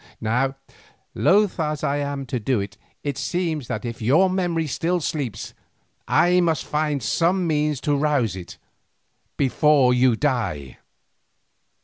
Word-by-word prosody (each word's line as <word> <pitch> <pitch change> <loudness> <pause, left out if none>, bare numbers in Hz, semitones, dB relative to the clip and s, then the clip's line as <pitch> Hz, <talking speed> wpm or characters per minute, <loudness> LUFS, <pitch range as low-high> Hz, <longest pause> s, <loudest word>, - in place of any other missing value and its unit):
Now, 125 +5 0 0.6
loth 200 -1 +2
as 150 -2 -2
I 140 - 0
am 140 -1 -3
to 130 -1 -3
do 120 +1 0
it, 100 0 -5 0.3
it 140 -2 -3
seems 160 -3 -2
that 110 - -4
if 115 -1 -6
your 160 - +4
memory 175 -3 0
still 170 +5 -1
sleeps, 135 - -4 0.5
I 180 +1 +4
must 165 -4 0
find 150 -2 -1
some 175 +3 +1
such - - -1
means 150 -3 0
to 145 - +1
rouse 140 -8 +1
it—before 135 - -1
you 125 -1 +3
die." 110 - -2
145 Hz, 135 wpm, -23 LUFS, 125-160 Hz, 0.6 s, your